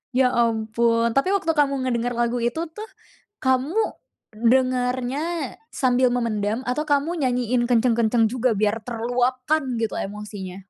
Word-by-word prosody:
Ya 255 -1 +4
ampun, 230 0 +1
tapi 365 +11 +2
waktu 330 -4 +1
kamu 280 -4 +1
ngedenger 245 -1 -1
lagu 240 +1 0
itu 240 +7 -1
tuh, 430 +5 -8 0.5
kamu, 260 - +1 0.5
dengernya 255 +6 0 0.2
sambil 255 -2 +2
memendam 220 -2 -1
atau 300 +5 0
kamu 295 +4 0
nyanyiin 245 -1 +1
kenceng-kenceng 235 -1 +2
juga 250 0 0
biar 210 +1 +1
terluapkan 250 +5 0 0.2
gitu 225 - -1
emosinya? 200 -2 -6
245 Hz, 125 wpm, -23 LUFS, 230-260 Hz, 0.5 s, Ya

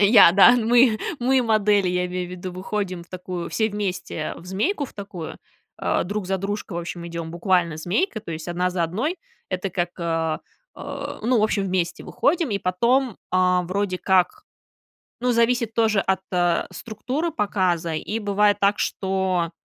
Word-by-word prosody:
Я, 200 -4 +8
да, 200 +5 +8
мы 240 -1 +4 0.2
мы 255 +1 +3
модели, 210 -4 +3
я 180 0 0
имею 180 0 -4
в - - -11
виду, 180 0 -6
выходим 185 -1 -3
в 170 - -19
такую 180 -1 -5
все 220 -1 +1
вместе, 190 -6 -3
в - - -12
змейку 285 - 0
в - - -11
такую, 195 -5 -7 0.4
а, - - 0
друг 205 +1 -3
за 190 0 0
дружкой, 200 -1 -4
в - - -1
общем, 170 0 -6
идём 170 -1 -5
буквально 170 -2 +1
змейкой, 210 - -1
то 190 - -8
есть 160 0 -6
одна 180 +1 0
за 180 -1 -1
одной. 235 - -2 0.3
Это 185 +1 -2
как, 175 0 -1
а, 165 -2 -1 0.3
а, - - -6
ну, 235 +1 +3
в - - +2
общем, 210 -2 +1
вместе 180 -2 -1
выходим 325 -2 +1
и 200 - 0
потом, 235 +6 +1
а, 180 0 +3
вроде 185 +1 -2
как, 190 - +2 0.8
ну, 250 0 +2
зависит 235 -1 +2
тоже 220 -3 +3
от, 190 -1 +1
а, 175 -1 +2
структуры 255 +9 -3
показа 185 - 0
и 210 +8 -3
бывает 205 -1 +2
так, 200 0 +2
что 190 -3 0
190 Hz, 175 wpm, -23 LUFS, 180-220 Hz, 0.8 s, Я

